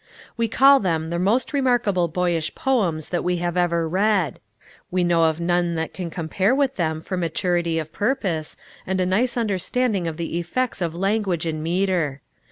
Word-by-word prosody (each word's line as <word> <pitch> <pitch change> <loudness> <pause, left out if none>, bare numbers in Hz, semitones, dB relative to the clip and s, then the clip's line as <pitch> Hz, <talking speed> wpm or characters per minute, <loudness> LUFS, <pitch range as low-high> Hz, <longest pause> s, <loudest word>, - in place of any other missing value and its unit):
We 230 -1 0
call 275 +5 +6
them 165 -5 -1
the 170 - -1
most 220 - +1
remarkable 240 -10 +2
boyish 170 -1 -1
poems 185 - 0
that 175 - -1
we 180 0 0
have 175 0 -2
ever 170 -2 +1
read. 190 0 +1 0.5
We 180 0 +1
know 170 -1 +3
of 160 0 +1
none 175 0 +1
that 160 0 -3
can 180 -3 -5
compare 185 +8 0
with 275 -1 +1
them 160 -3 -1
for 185 - -4
maturity 170 0 0
of 155 -1 -4
purpose, 195 - -1 0.3
and 190 0 -1
a 185 - +2
nice 225 +8 +1
understanding 210 -2 0
of 160 -1 -4
the 170 0 -3
effects 225 +6 -2
of 170 -2 -2
language 195 -2 0
and 155 -1 -2
metre. 170 -5 0
180 Hz, 175 wpm, -23 LUFS, 165-205 Hz, 0.5 s, call